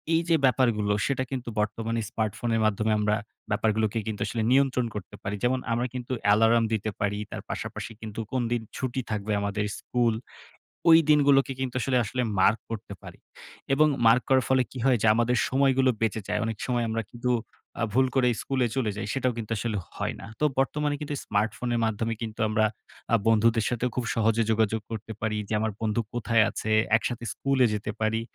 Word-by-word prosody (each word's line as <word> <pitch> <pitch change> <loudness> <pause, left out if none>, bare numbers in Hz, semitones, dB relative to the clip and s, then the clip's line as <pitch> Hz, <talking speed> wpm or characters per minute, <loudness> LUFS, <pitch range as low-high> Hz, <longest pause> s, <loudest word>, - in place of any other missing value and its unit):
এইযে 165 0 +2
ব্যাপারগুলো 120 -5 +2
সেটা 135 -2 0
কিন্তু 125 -3 -4
বর্তমানে 115 +2 -1
স্মার্টফোনের 115 +1 -1
মাধ্যমে 110 +1 +1
আমরা 105 0 +2 0.4
ব্যাপারগুলোকে 110 +1 +1
কিন্তু 110 -2 -4
আসলে 115 -2 -2
নিয়ন্ত্রণ 130 -2 +3
করতে 100 -3 -7
পারি। 100 +1 -2
যেমন 130 +1 +2
আমরা 120 +2 +1
কিন্তু 125 0 -6
অ্যালার্ম 110 +3 +5
দিতে 110 0 -1
পারি, 100 0 0
তার - - -5
পাশাপাশি - - -5
কিন্তু 110 -1 -7
কোনদিন 120 -2 0 0.2
ছুটি 130 0 -2
থাকবে 105 0 -2
আমাদের 100 +1 -1
স্কুল, 120 -2 +1 0.8
ওই 160 - +10
দিনগুলোকে 140 -2 +5
কিন্তু 130 -2 -3
আসলে 130 +1 +1
আসলে 125 +4 -2 0.2
মার্ক 105 +4 +4
করতে 110 -2 -6
পারি - - -12 0.5
এবং 155 +3 +5 0.2
মার্ক 115 +2 +6
করার 130 -3 +4
ফলে 130 -1 +4
কি - - -9
হয়? 130 -2 +4
যে - - +3
আমাদের 120 +2 +2
সময়গুলো 135 -1 +3
বেঁচে 110 -1 0
যায়। - - 0
এ - - -1
অনেক 110 -2 -3
সময় 120 -2 0
আমরা 115 +1 -1
কিন্তু 125 +1 -2 0.5
আ - - +2
ভুল 130 +2 +4
করে 130 -2 +4
স্কুলে 130 -2 0
চলে 120 -5 0
যাই। 105 - -4
সেটাও 130 -2 0
কিন্তু 115 -1 -5
আসলে 110 +1 -2 0.2
হয় - - -2
না। - - -9
তো 150 - +2
বর্তমানে 145 +2 0
কিন্তু 150 -1 -3
স্মার্টফোনের 115 +3 -1
মাধ্যমে 110 +1 -1
কিন্তু 110 -1 -5
আমরা 110 0 +2 0.5
আ - - +8
বন্ধুদের 115 0 +3
সাথেও 120 +1 -1
খুব 125 - -1
সহজে 115 0 +2
যোগাযোগ 110 0 +1
করতে 110 0 -6
পারি 110 -1 -1
যে - - -4
আমার 110 0 0
বন্ধু 110 +1 0
কোথায় 115 -2 +3
আছে? 110 - -4 0.3
একসাথে 120 +1 -4
স্কুলে 135 -2 +2
যেতে 105 0 -3
পারি। 110 +1 +1
115 Hz, 185 wpm, -27 LUFS, 110-130 Hz, 0.8 s, ওই